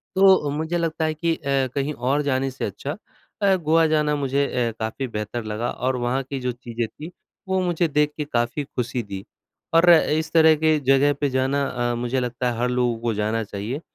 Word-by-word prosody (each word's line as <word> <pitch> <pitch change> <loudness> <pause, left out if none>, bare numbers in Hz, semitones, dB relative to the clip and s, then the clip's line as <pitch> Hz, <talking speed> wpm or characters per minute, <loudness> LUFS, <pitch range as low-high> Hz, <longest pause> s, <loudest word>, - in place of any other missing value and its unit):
तो 190 0 +7
अ, 150 - -2
मुझे 160 +2 -1
लगता 165 -1 -1
है 155 - 0
कि 165 +1 0
अ, 140 -3 0
कहीं 140 +1 -1
और 135 +3 0
जाने 135 -1 0
से 130 - -4
अच्छा 145 +3 -5 0.5
अ, 195 -1 +4
गोवा 165 -1 +3
जाना 150 -1 +1
मुझे 140 0 0
अ, 120 -2 -1
काफ़ी 110 +4 -3
बेहतर 110 +1 -4
लगा 110 +2 -3
और 130 +1 -1
वहाँ 125 +2 0
की 135 +1 -5
जो 125 -1 -2
चीज़ें 120 -1 -4
थीं, 155 +8 -10 0.4
वो 190 0 +1
मुझे 175 -1 +1
देख 150 0 +1
के 150 - -2
काफ़ी 120 +1 -1
खुशी 125 -2 -3
दी। 100 -2 -7 0.5
और 165 +2 +6
इस 160 -1 +4
तरह 160 -1 +6
के 155 0 +2
जगह 135 +1 +3
पे 145 - +2
जाना 135 +2 0
अ, 120 -1 -1
मुझे 120 +2 -1
लगता 125 0 -2
है 115 - -5
हर 125 +1 +1
लोगों 125 -2 0
को 115 -1 0
जाना 110 +2 -1
चाहिए, 105 +7 -5
135 Hz, 210 wpm, -23 LUFS, 120-155 Hz, 0.5 s, तो